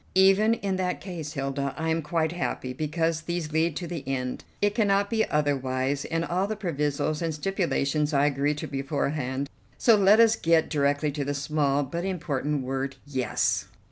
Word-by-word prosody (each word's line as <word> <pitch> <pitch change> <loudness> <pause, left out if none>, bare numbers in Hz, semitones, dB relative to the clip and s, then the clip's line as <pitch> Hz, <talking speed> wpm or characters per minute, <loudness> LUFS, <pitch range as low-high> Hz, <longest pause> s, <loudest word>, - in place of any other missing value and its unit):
"Even 195 +4 +5
in 195 -4 -2
that 180 -1 -1
case, 165 -6 -6
Hilda, 135 -1 -2
I 160 0 -1
am 160 +1 +1
quite 160 +1 0
happy, 150 -7 -3
because 160 +3 -1
these 170 -1 -3
lead 160 +1 +1
to 180 - -4
the 170 -3 -5
end. 125 -2 -2 0.2
It 205 0 +2
cannot 200 -2 +2
be 220 -1 +1
otherwise, 135 -2 0
and 165 0 -1
all 185 +4 0
the 215 - -2
provisos 150 -5 -1
and 165 -2 -1
stipulations 150 -4 0
I 140 -1 +3
agree 145 +1 +1
to 150 - -5
beforehand, 140 -1 -2 0.3
so 230 - +5
let 205 +1 +5
us 225 -1 +6
get 165 -5 +2
directly 145 0 +1
to 145 0 -3
the 145 +1 -2
small 145 -1 +1
but 170 +6 -4
important 150 -6 -2
word 135 +1 -3
'Yes! 130 -5 0
155 Hz, 175 wpm, -27 LUFS, 140-175 Hz, 0.3 s, us